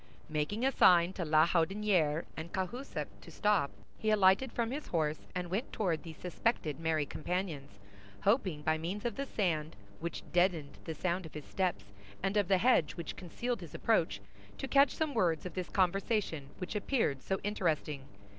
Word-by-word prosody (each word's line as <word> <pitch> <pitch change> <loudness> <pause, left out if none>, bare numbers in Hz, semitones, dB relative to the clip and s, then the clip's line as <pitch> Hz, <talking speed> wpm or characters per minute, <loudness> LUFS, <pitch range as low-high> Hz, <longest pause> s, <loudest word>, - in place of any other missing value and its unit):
Making 155 +11 -1
a 270 - +4
sign 175 -6 +6
to 185 - -3
La 155 0 +5
Houdinière 175 -2 +2
and 160 +2 -6
Cahusac 235 +9 -3 0.2
to - - -12
stop, 205 -10 +2 0.3
he 220 - 0
alighted 210 +4 +4
from 235 -1 -1
his 290 +3 -4
horse, 155 -2 -1
and 180 -1 -3
went 215 +8 -2
toward 175 -7 0
these 160 -3 -9
suspected 180 - -1
merry 160 -2 +1
companions, 155 - -4 0.4
hoping, 190 - +1
by 155 +1 +1
means 185 +7 -4
of 235 -3 -1
the 275 0 -3
sand 160 -9 -1 0.2
which 170 0 -4
deadened 175 -5 +1
the 160 - -4
sound 175 +2 -1
of 155 - -16
his 150 - -6
steps 170 - -2 0.3
and 195 +1 0
of 205 -3 +3
the 190 0 +4
hedge 180 - +3
which 170 -3 -5
concealed 235 +7 -3
his - - -9
approach, - - +1 0.4
to 270 - -4
catch 275 +1 +6
some 310 -2 -1
words 170 - +1
of 180 - -5
this 180 0 -4
conversation 185 -5 0
which 180 - -5
appeared 210 - 0
so 190 - -1
interesting. 155 -8 -1
180 Hz, 175 wpm, -33 LUFS, 160-210 Hz, 0.4 s, sign